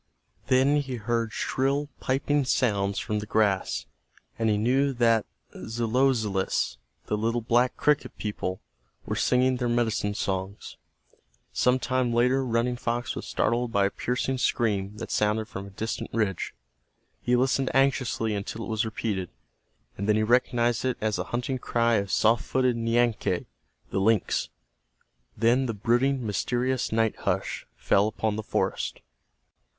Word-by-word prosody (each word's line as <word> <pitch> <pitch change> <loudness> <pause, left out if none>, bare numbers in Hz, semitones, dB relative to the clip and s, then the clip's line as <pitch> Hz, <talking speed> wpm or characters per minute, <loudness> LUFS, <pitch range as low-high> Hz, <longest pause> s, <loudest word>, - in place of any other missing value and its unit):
Then 135 +2 +4
he 135 -3 -2
heard 115 0 -1
shrill 140 +5 0
piping 140 +2 +1
sounds 100 -7 +1
from 105 -2 -1
the 105 - -6
grass, 105 -3 +1 0.5
and 115 -1 +2
he 105 - +2
knew 135 +6 +2
that 115 -3 +3 0.2
the - - -9
Zelozelous, 115 -3 +1 0.3
the - - -1
little 115 +3 0
black 120 +2 +2
cricket 150 0 +1
people, 100 -3 -4 0.4
were - - -2
singing 125 0 +2
their 120 -1 -1
medicine 110 -3 0
songs. 95 -1 -4 0.8
Some 125 +1 +3
time 130 -1 0
later 125 +3 +3
Running 120 0 0
Fox 120 0 -2
was - - -6
startled 120 0 0
by 100 -2 +3
a - - +2
piercing 130 +1 -2
scream 105 -4 0
that 115 +1 -6
sounded 105 +1 +1
from 100 -2 -7
a - - -10
distant 110 +3 -4
ridge. 105 -5 -1 0.7
He 125 - +2
listened 130 +1 +2
anxiously 130 -5 +1
until 105 +2 -4
it - - -8
was 110 +1 0
repeated, 105 -4 -3 0.7
and 100 +2 -2
then 105 - +5
he 110 - +2
recognized 120 0 +2
it 130 -1 0
as 110 -1 0
the - - -2
hunting 125 +2 -2
cry 115 -1 +2
of 100 -1 -2
soft 110 +1 +3
footed 130 -2 +1
Nianque, 115 -5 +1 0.5
the - - 0
lynx. 105 0 +1 0.9
Then 120 +3 +3
the 115 - -3
brooding, 120 +4 +1
mysterious 125 +5 -1
night 110 0 +1
hush - - -2
fell 100 +2 +2
upon 110 0 -1
the 110 - -3
forest. - - -2
115 Hz, 150 wpm, -27 LUFS, 105-125 Hz, 0.9 s, then